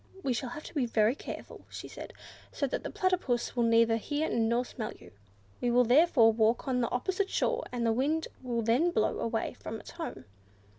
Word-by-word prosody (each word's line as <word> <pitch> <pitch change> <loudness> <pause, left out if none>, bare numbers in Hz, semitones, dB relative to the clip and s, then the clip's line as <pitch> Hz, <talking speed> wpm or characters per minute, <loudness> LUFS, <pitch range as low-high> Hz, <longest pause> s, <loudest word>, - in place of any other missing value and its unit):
"We 260 - +1
shall 245 +1 -3
have 300 +5 -7
to - - -10
be 275 -6 0
very 220 0 +3
careful," - - -8
she - - -8
said, - - -9 0.4
"so 280 - -1
that 270 - -2
the - - -5
Platypus 360 -13 0
will 245 - +1
neither 230 0 +4
hear 290 +7 -2
nor 235 +2 +1
smell 220 -3 -5
you. - - -16 0.5
We 245 - +1
will 245 +1 +5
therefore 245 -3 +5
walk 225 +4 +2
on 250 -1 +1
the 235 - 0
opposite 380 +10 -1
shore, - - 0
as 245 -1 -2
the 230 -1 +3
wind 300 +7 0
will 240 -3 -2
then 245 +10 +3
blow 220 -11 0
away 225 -1 -1
from 220 - -7
its - - -11
home." 335 -1 -7
245 Hz, 205 wpm, -30 LUFS, 230-295 Hz, 0.5 s, will